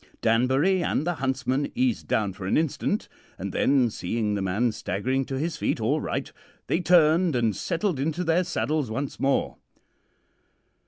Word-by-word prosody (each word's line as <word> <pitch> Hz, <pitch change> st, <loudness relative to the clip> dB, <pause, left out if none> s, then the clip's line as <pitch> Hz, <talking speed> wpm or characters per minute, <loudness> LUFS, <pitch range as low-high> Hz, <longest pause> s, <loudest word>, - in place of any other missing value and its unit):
Danbury 130 Hz, +11 st, +3 dB
and 155 Hz, -, 0 dB
the 175 Hz, -, 0 dB
huntsman 130 Hz, +1 st, -1 dB
eased 255 Hz, -1 st, 0 dB
down 105 Hz, -3 st, 0 dB
for 95 Hz, -1 st, -7 dB
an -, -, +2 dB
instant; 160 Hz, -3 st, -1 dB, 0.3 s
and -, -, -5 dB
then, 130 Hz, -4 st, +3 dB
seeing 105 Hz, +3 st, -2 dB
the 100 Hz, -, -1 dB
man 100 Hz, +6 st, +1 dB
staggering 125 Hz, +6 st, -2 dB
to 135 Hz, -, -4 dB
his 160 Hz, +3 st, -2 dB
feet -, -, -1 dB
all -, -, +1 dB
right, -, -, -3 dB, 0.3 s
they 165 Hz, -, 0 dB
turned 170 Hz, -2 st, +4 dB
and 115 Hz, -4 st, +1 dB
settled 170 Hz, -, -1 dB
into 160 Hz, +5 st, -1 dB
their 170 Hz, +2 st, +2 dB
saddles 150 Hz, -4 st, -1 dB
once 135 Hz, +5 st, -4 dB
more. 135 Hz, 0 st, 0 dB
135 Hz, 160 wpm, -26 LUFS, 115-165 Hz, 0.3 s, turned